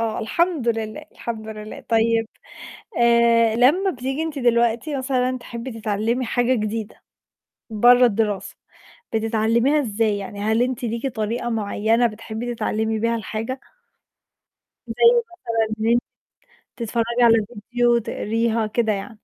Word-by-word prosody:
آه، 225 -1 -1
الحمد 320 +2 0
لله، 220 -2 -2
الحمد 220 -2 -6
لله. 215 0 -8
طيب 225 0 +2 0.7
آآ، 235 -1 +4
لمّا 300 +12 +4
بتيجي 270 +2 -3
أنتِ 310 -3 -4
دلوقتي 235 +3 +1
مثلًا 255 -1 0
تحبّي 240 +1 -7
تتعلّمي 220 +5 -1
حاجة 245 +2 +1
جديدة 215 -1 -4 0.7
برّه 245 +3 +6
الدراسة، 210 -2 -1 0.6
بتتعلميها 225 +5 +2
إزاي، 215 -4 0
يعني 200 +1 -7
هل 220 +2 +2
أنتِ 250 -1 -2
ليكِ 235 +3 -2
طريقة 230 0 -2
معينة 225 +2 +1
بتحبّي 225 +2 -5
تتعلمي 220 -1 -1
بيها 230 +1 0
الحاجة؟ 225 +4 -4 1.3
زَي - - -5 0.3
مثلًا 230 - -3
إن 220 - 0
أنتِ 240 - +3 0.7
تتفرّجي 235 +1 -1
على 230 -3 +5 0.2
فيديو، 240 -1 +3
تقريها، 225 0 -1
كده 220 0 0
يعني. 195 -1 -4
230 Hz, 125 wpm, -22 LUFS, 220-245 Hz, 1.3 s, برّه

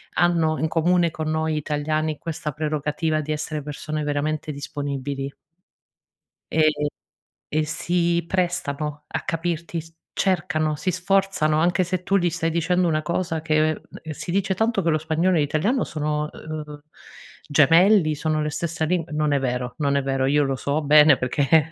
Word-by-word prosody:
hanno 165 -3 +2
in 160 - +1
comune, 170 +1 +2
con 155 0 -5
noi 155 0 0
italiani, 155 +1 -1
questa 155 -2 -4
prerogativa 155 +1 -1
di 155 +1 -4
essere 150 0 -3
persone 150 +1 -4
veramente 150 +1 -2
disponibili. 140 -1 -4 1.2
E 155 -1 +4 0.8
e 155 0 +2
si 170 +2 0
prestano 155 -5 -2
a - - -3
capirti 170 0 -3
s 165 +1 -17 0.2
cercano, 160 -5 0
si 170 +5 -2
sforzano, 180 -4 +1
anche 175 +2 +2
se 180 0 -2
tu 195 +2 +1
gli 175 -2 +2
stai 165 0 -1
dicendo 175 +2 +1
una 155 -1 +1
cosa 170 0 -2
che 155 0 +2 0.3
ehm, 160 - -7
si 170 - -6
dice 195 0 +1
tanto 220 0 +1
che 170 - 0
lo 155 - +3
spagnolo 160 +4 +1
e 160 - +3
l'italiano 165 - +1
sono, 150 -1 -2
uhm, 150 -2 -7 0.7
gemelli, 165 +3 +5
sono 155 +1 -1
le 150 - -1
stessa 160 +1 -2
lin 175 +1 0
non 150 -1 0
è 140 - +2
vero 125 -1 -2
non 140 -2 +1
è - - +2
vero, 135 -1 0
io 145 +1 +3
lo 135 -1 0
so 140 +4 -1
bene 150 -1 +6
perché 150 +4 +2
155 Hz, 165 wpm, -23 LUFS, 150-170 Hz, 1.2 s, bene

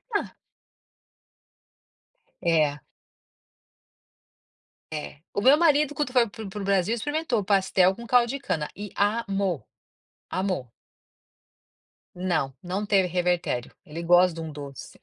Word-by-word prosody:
Ah. - - -1 2.1
É. 155 -4 +2 2.1
É. 150 -1 -6
O - - +1
meu 265 +5 +7
marido 300 -2 +3
quando 295 -5 -2
foi 245 -3 +4
para - - -13
o - - -28
para 220 - -8
o - - -6
para 205 +1 -6
o - - -4
Brasil 200 +3 +2
experimentou 280 -3 -1
pastel 190 -2 +3
com 235 +1 -10
caldo 245 -1 +4
de 275 +3 -3
cana 160 - -2
e 205 0 -7
amou, 200 - 0 0.7
amou. 185 -9 -2 1.5
Não, 175 -7 0
não 190 +4 -2
teve 195 -3 +3
revertério. 175 -8 -1
Ele 160 +3 -6
gosta 175 +1 +5
de 165 - -6
um 160 -1 -5
doce. 140 -2 -9
195 Hz, 130 wpm, -26 LUFS, 170-235 Hz, 2.1 s, meu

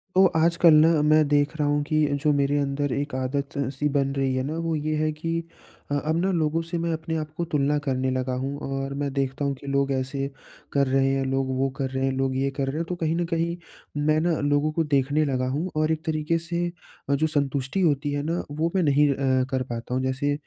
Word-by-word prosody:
तो 190 - +7
आजकल 170 0 +5
ना, 155 0 +5
मैं 155 0 +4
देख 145 +1 +2
रहा 150 -2 +1
हूँ 145 0 +2
कि 155 0 +2 0.2
जो 150 - +4
मेरे 140 +1 +2
अंदर 140 0 -1
एक 140 0 -3
आदत-सी 140 +1 -2
बन 140 -1 +1
रही 135 -1 +1
है 130 - 0
ना, 150 +4 -3
वो 165 -1 -1
ये 155 +1 -1
है 155 0 +1
कि 165 +2 -3 0.5
अ, - - +1
अब 155 +1 +1
ना 190 +1 +1
लोगों 165 -2 +1
से 165 +1 -4
मैं 170 0 -1
अपने 160 0 -3
आप 155 -1 -4
को 170 - -1
तुलना 145 0 +2
करने 130 -1 0
लगा 130 0 -1
हूँ 140 +2 -3 0.2
और 135 0 -3
मैं 145 -1 -1
देखता 135 +1 -1
हूँ 140 - 0
कि 140 - -12
लोग 140 0 +1
ऐसे 135 +1 -1 0.5
कर 140 -1 +3
रहे 135 +1 +2
हैं, 135 0 0
लोग 135 0 0
वो 135 +1 +1
कर 135 -2 -1
रहे 130 0 -2
हैं, 135 - +1
लोग 135 -1 0
ये 135 +1 +1
कर 135 - 0
रहे 135 - -2
हैं, 165 - -1
तो 180 - -1
कहीं 165 -2 -1
न 175 0 0
कहीं 170 +1 0 0.5
मैं 155 0 +3
ना, 170 -1 +1
लोगों 145 +1 +1
को 165 +1 0
देखने 145 +1 +1
लगा 130 -2 0
हूँ 170 +5 -2
और 155 +1 +1
एक 160 0 -2
तरीके 155 0 0
से 170 +1 -2 0.4
अ, 140 - +4
जो 155 +3 +1
संतुष्टि 140 +2 -1
होती 145 -3 +1
है 145 0 -1
ना, 165 +3 -1
वो 160 +3 -1
मैं 185 - +3
नहीं 145 0 +4
अ, 130 -1 +1
कर 130 -1 0
पाता 120 +1 -5
हूँ। 130 +1 0
जैसे 135 +2 0
145 Hz, 245 wpm, -25 LUFS, 135-160 Hz, 0.5 s, तो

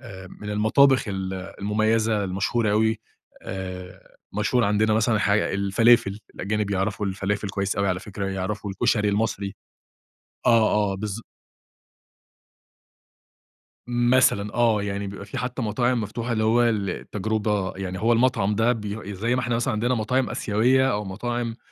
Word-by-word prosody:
آآ، 95 -1 -10
من 105 - -5
المطابخ 125 +6 +4
ال 95 -1 -3
المميزة 105 +3 0
المشهورة 100 +4 0
أوي 110 +1 +2 0.4
آآ، 90 -1 -8 0.2
مشهور 110 +3 +1
عندنا 105 +1 +2
مثلًا 110 0 +2
حاج 100 0 +2
الفلافل، 100 +1 +2
الأجانب 105 +2 -2
بيعرَفوا 100 +1 -1
الفلافل 100 +1 -2
كويس 100 0 -2
أوي 100 -1 +1
على 90 -1 -1
فكرة، 100 -1 -5
يعرَفوا 95 +2 -3
الكشري 105 +2 +1
المصري. 100 -1 -1 0.9
آه، 115 -2 +5 0.2
آه، - - -4
بالض 105 +2 -4 2.7
مثلًا 120 -4 +2
آه، 115 -3 +3
يعني 100 0 -3
بيبقى 100 0 -7
في 105 - -6
حتى 125 +1 -3
مطاعم 120 +2 +1
مفتوحة 115 +3 -4
اللي 110 -1 0
هو 115 +2 +4
للتجربة 105 -1 -1
يعني 95 -1 -4
هو 115 +2 +3
المطعم 115 -4 +2
ده 115 +3 +3
بي 105 -2 -5
زي 115 +6 0
ما 130 - +1
إحنا 120 -1 -1
مثلًا 120 +1 0
عندنا 120 +4 +1
مطاعم 125 +4 0
آسيوية 125 +5 +2
أو 105 +1 -2
مطاعم 115 +4 -3
105 Hz, 140 wpm, -24 LUFS, 100-115 Hz, 2.7 s, آه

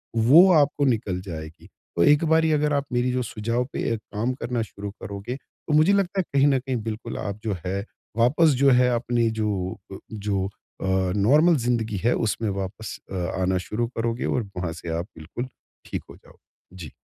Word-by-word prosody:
वो 145 +12 +7
आपको 145 -2 +3
निकल 110 -8 0
जाएगी। 80 -3 -8 0.3
तो 85 - +3
एक 150 - +5
बारी 160 0 +3
अगर 150 -1 +2
आप 140 -1 +1
मेरी 120 +1 +1
जो 125 0 0
सुझाव 115 +2 -2
पे - - -1
अ, - - +1
काम 110 +3 -3
करना 125 -2 -3
शुरू 100 -2 -6
करोगे, 100 +5 -5
तो 145 +2 -8
मुझे 155 +6 +5
लगता 195 -1 +1
है - - +3
कहीं 140 +1 +5
न 135 -2 +3
कहीं 130 0 -3
बिल्कुल 110 0 -5
आप 100 +1 -4
जो 105 -4 -1
है 100 +2 -2 0.3
वापस 140 +8 +4
जो 140 - +7
है 125 0 +5
अपनी 120 -1 +1
जो 95 -3 -1 0.2
अ, - - -6 0.2
जो 100 -2 -1 0.4
अ, - - -2 0.3
नॉर्मल 150 - +5
ज़िंदगी 115 -4 0
है, 120 - +3
उसमें 110 -1 -1
वापस 100 +2 -5
अ, - - -4 0.3
आना 95 0 +2
शुरू 115 +2 -1
करोगे 115 +1 -1
और 125 - 0
वहाँ 90 -2 -2
से 85 +1 -8
आप 85 - -4
बिल्कुल 80 +11 -6 0.4
ठीक - - -4
हो - - -11
जाओगे। 90 - -23
जी। 80 -6 -8
115 Hz, 195 wpm, -24 LUFS, 100-135 Hz, 0.4 s, वो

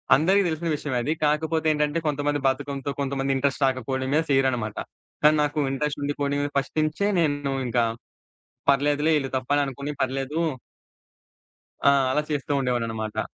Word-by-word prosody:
అందరికి 190 +7 +3
తెలిసిన 165 +1 -2
విషయమే 145 -3 -3
అది, 150 +5 0
కాకపోతే 160 +1 +1
ఏంటంటే, 150 +2 0
కొంతమంది 145 0 0
బద్దకంతో, 140 +1 -2
కొంతమంది 135 0 -1
ఇంట్రస్ట్ 140 +1 0
రాకపోయడం 130 0 -1
మీద 155 - +4
చేయరనమాట. 130 -5 +1 0.5
కానీ 155 +1 +6
నాకూ 150 +1 0
ఇంట్రస్టుండి 145 +1 -2
పోనీ, 140 0 0 0.2
ఫస్ట్ 135 - -2
నుంచే 155 +7 0
నేను 145 -4 0
ఇంకా 120 0 +2 0.9
పర్లేదులే, 145 +3 +2
ఈళ్ళు 135 -2 -4
తప్పని 145 +3 +1
అనుకోనీ 140 +2 -5
పర్లేదూ 135 +4 -2 1.5
ఆ! - - +7 0.2
అలా 150 +3 +2
చేస్తూ 145 -1 -2
ఉండేవాడిననమాట. 115 -4 -2
140 Hz, 135 wpm, -25 LUFS, 135-150 Hz, 1.5 s, ఆ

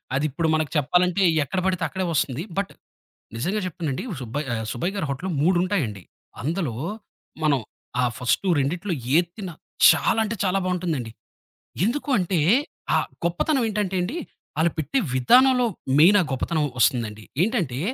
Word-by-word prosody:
అది 140 - +1
ఇప్పుడు 160 +4 -1
మనకు 155 -2 -1
చెప్పాలంటే 180 +6 +2 0.2
ఎక్కడబడితే 185 +2 -1
అక్కడే 185 +4 -3
ఒస్తుంది. 145 0 0
బట్, 200 -1 -1 0.6
నిజంగా 180 - -1
చెప్తునండి 160 - -3 0.2
సుబ్బయ 125 +6 -3
ఆహ్, 110 -1 -3
సుబ్బయ్య 175 +11 -2
గారి 195 -6 -2
హోటల్లు 165 +8 -3
మూడుంటాయండి. 175 - +1 0.4
అందులో, 155 -3 -2 0.7
మనం 145 -3 +3 0.4
ఆ - - +2
ఫస్టు 125 +10 0
రెండిట్లో 170 +7 -1 0.2
ఏతిన్న 175 +2 -2 0.4
చాలా - - +3
అంటే 220 +1 -3
చాలా 190 0 +1
బాగుంటుందండి. 170 -10 -2 0.7
ఎందుకంటే 225 - 0 0.6
ఆ - - +5 0.3
గొప్పతనం 245 - +1
ఏంటంటే 205 -3 -1
అండి, 220 - -3 0.4
ఆలుపెట్టే 165 - 0 0.2
విధానంలో 250 - +5 0.3
మెయిన్ 185 +7 +7
ఆ - - +1
గొప్పతనం 150 +4 0
ఒస్తుందండి. 110 -1 +1 0.2
ఏంటంటే 180 - -1
175 Hz, 125 wpm, -24 LUFS, 140-195 Hz, 0.7 s, మెయిన్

